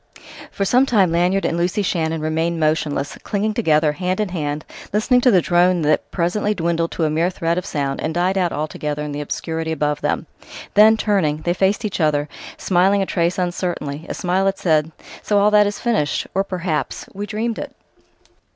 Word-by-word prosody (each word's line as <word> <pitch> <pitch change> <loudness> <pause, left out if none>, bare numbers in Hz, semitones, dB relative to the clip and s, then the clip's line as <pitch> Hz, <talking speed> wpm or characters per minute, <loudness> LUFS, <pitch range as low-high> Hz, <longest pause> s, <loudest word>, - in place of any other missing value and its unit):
For 195 - -2
some 250 +6 +3
time 195 -8 +3
Lanyard 180 +3 +1
and - - 0
Lucy 175 +4 0
Shannon 160 -3 -1
remained 160 +2 -1
motionless, 155 -2 -1
clinging 215 +1 -1
together, 155 -8 +2
hand 180 +5 -2
in 210 -2 0
hand, 150 -4 -3 0.3
listening 245 +5 +2
to 250 - +5
the 185 -7 +4
drone 175 -1 +3
that 150 +1 +1
presently 205 +4 0
dwindled 170 -1 0
to 165 - -2
a 155 - +2
mere 165 +3 +1
thread 170 -2 -1
of 180 - -8
sound 140 -2 -2
and 160 - -1
died 180 +3 0
out 180 -3 +1
altogether 150 0 -3
in 150 - -5
the 145 +1 -4
obscurity 160 +2 -3
above 150 -1 -1
them. - - -1 0.5
Then, 215 +2 +6
turning, 165 -9 0
they 175 - +1
faced 195 +5 +1
each 205 - -3
other, 150 -1 +1 0.3
smiling 195 +2 +2
a - - -2
trace 170 -1 0
uncertainly, 175 -4 -3
a - - -3
smile 185 +2 0
that 195 0 +1
said: 155 -2 +1 0.3
"So 205 - +1
all 205 +1 +4
that 210 -1 +5
is 205 - -3
finished!... 220 -12 0
Or, 195 - +1
perhaps, 180 -5 -3
we 205 +2 -5
dreamed 220 +2 -2
it!"... - - -7
175 Hz, 195 wpm, -20 LUFS, 155-195 Hz, 0.5 s, Then